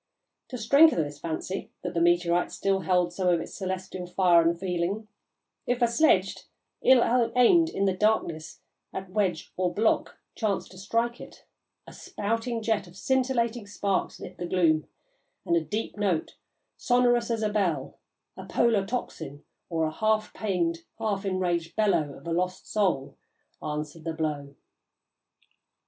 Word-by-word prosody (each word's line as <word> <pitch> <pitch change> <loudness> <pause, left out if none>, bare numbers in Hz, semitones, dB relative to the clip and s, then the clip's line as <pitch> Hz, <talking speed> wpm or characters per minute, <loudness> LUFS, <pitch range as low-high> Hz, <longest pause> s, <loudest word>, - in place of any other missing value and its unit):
To 255 - -6
strengthen 275 - +5
this 145 0 -8
fancy 170 +4 -4
that 180 0 -3
the 170 - 0
meteorite 175 0 +2
still 195 -1 0
held 180 -1 +1
some 185 0 -1
of 175 -2 +4
its - - -7
celestial 185 -1 -5
fire 180 -1 +4
and 170 +1 +1
feeling, 185 +3 -2 0.6
if 245 0 +1
a 240 - +4
sledge, 230 -7 +3 0.4
ill 245 -2 +4
aimed 325 +7 +5
in 200 - -1
the 190 - +2
darkness 185 -6 -1 0.3
at 190 -1 -6
wedge 185 -5 -1
or 180 -1 +1
block, 220 +3 +1 0.2
chanced 210 -4 -2
to 185 - -12
strike 230 +4 -1
it, - - -13 0.4
a - - -12
spouting 225 +2 -3
jet 220 -4 0
of 175 +1 -15
scintillating 245 -3 0
sparks 200 -1 -1
lit - - -10
the 175 - -3
gloom, 165 -4 +2 0.6
and 170 - +2
a 170 - +3
deep 210 +8 -4
note, 195 -6 -1 0.4
sonorous 245 -1 +2
as 225 -2 -1
a 215 - +2
bell, 180 -10 -1 0.4
a - - -9
Polar 230 -4 +2
tocsin, 160 - -5 0.3
or 165 -2 0
the 155 - -2
half 215 0 +1
pained, 175 -5 -1 0.2
half 210 -3 -2
enraged 175 -3 -1
bellow 195 -10 +1
of - - -16
a 170 - -2
lost 180 +2 -2
soul, 185 -10 0 0.4
answered 150 +1 -5
the 165 - -2
blow." 145 -3 -3
190 Hz, 155 wpm, -27 LUFS, 170-220 Hz, 0.6 s, strengthen